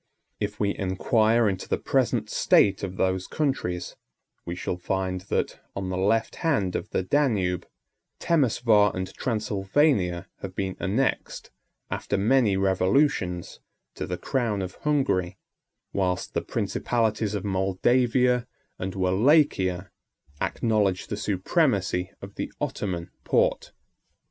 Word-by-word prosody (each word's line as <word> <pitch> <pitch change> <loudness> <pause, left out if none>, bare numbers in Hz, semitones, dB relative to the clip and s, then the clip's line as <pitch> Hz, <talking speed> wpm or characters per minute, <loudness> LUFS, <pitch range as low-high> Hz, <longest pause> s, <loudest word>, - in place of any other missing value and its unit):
If 105 0 -3
we 100 -1 +1
inquire 110 +4 +2
into 95 -2 -2
the - - +1
present - - 0
state 100 -1 +3
of 95 -1 -5
those 95 0 0
countries, 130 - -2 0.5
we 85 - -3
shall 90 0 -3
find 95 0 -2
that, - - -1 0.2
on 95 -1 -3
the 95 - -2
left 105 +5 +1
hand 105 - 0
of - - -3
the - - -1
Danube, 100 - +1 0.5
Temeswar 115 - +3
and 95 0 -4
Transylvania 105 - 0
have 95 -1 -7
been 95 -1 -2
annexed, 125 +8 -1 0.4
after - - -1
many 110 -1 +3
revolutions, 95 - +1 0.3
to - - -5
the 90 +1 -3
crown 115 -6 -1
of 90 - -5
Hungary; 100 -12 0 0.6
whilst 90 -2 -1
the - - 0
principalities 110 -3 -1
of 105 - -3
Moldavia 120 +6 +2 0.3
and 95 +1 -4
Wallachia 95 - +2 0.5
acknowledge 105 -5 +1
the - - -2
supremacy 100 - 0
of 100 0 -8
the - - -3
Ottoman 90 -4 -3
Porte. - - +1
100 Hz, 120 wpm, -26 LUFS, 95-115 Hz, 0.6 s, state